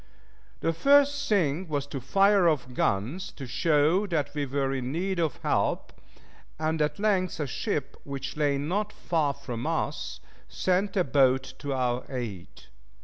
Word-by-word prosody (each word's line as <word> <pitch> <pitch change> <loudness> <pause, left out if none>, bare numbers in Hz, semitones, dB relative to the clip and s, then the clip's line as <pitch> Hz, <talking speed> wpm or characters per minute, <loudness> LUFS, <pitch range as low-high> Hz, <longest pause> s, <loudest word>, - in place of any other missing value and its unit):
The 165 - +1
first 285 - +4
thing 180 -4 +1
was 145 -3 -1
to 140 -2 -6
fire 195 +6 +4
off 130 -5 -2
guns, 120 - -1
to 135 - -8
show 155 +8 +2
that 160 -6 -1
we 145 -2 -2
were 135 0 0
in 130 -1 -3
need 185 +4 -1
of 160 -5 0
help, - - 0 0.6
and 155 0 -1
at 150 0 0
length 195 -5 +1
a 150 - 0
ship, 140 +2 -3
which 135 -1 -5
lay 145 -2 +1
not 195 +9 -1
far 155 -8 0
from 125 -2 -5
us, 155 -3 -2 0.3
sent 190 +2 0
a 185 - +4
boat 130 -1 +2
to 145 -1 -3
our 125 -1 0
aid. 115 -9 -6
150 Hz, 155 wpm, -27 LUFS, 135-180 Hz, 0.6 s, first